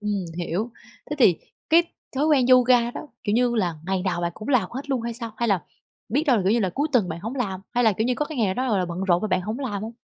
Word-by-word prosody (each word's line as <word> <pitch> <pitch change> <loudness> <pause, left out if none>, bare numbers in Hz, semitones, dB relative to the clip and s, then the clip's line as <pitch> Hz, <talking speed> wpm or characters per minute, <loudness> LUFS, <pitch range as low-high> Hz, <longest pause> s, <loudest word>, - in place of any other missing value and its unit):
Ừm, 205 -3 -2
hiểu. 185 +7 -2 0.4
Thế 295 - -2
thì 185 -10 +5 0.3
cái 335 +2 +7 0.3
thói 295 +3 +2
quen 275 -5 +4
yoga 250 -2 +5
đó, 300 - -7 0.2
kiểu 205 - 0
như 245 0 +2
là, 175 -6 0
ngày 190 -1 0
nào 175 -2 -1
bạn 170 0 -1
cũng 215 - -9
làm 240 -9 +2
hết 275 +3 -6
luôn 260 - +1
hay 235 0 -3
sao? 230 -2 -6
Hay 235 -1 0
là 190 -5 +2 0.5
biết 285 +9 +1
đâu 255 - +5
là, 200 - +1
kiểu 195 +3 +2
như, 235 - +2
là 190 -3 0
cuối 290 - -1
tuần 215 -8 +3
bạn 165 +1 -5
hổng 225 +6 -5
làm, 195 -8 -2
hay 245 0 +3
là, 220 - +5
kiểu 220 +4 -1
như, 250 - +1
có 300 - -1
cái 300 -4 -7
ngày 220 - +3
nào 190 - -1
đó, 260 - -1
gọi 200 - +2
là, 180 - +1
bận 170 +1 -5
rộn 175 -2 +2
mà 215 - -1
bạn 185 0 +1
hổng 215 +7 -4
làm 210 -7 -3
hông? 225 +2 -5
225 Hz, 310 wpm, -24 LUFS, 190-250 Hz, 0.5 s, cái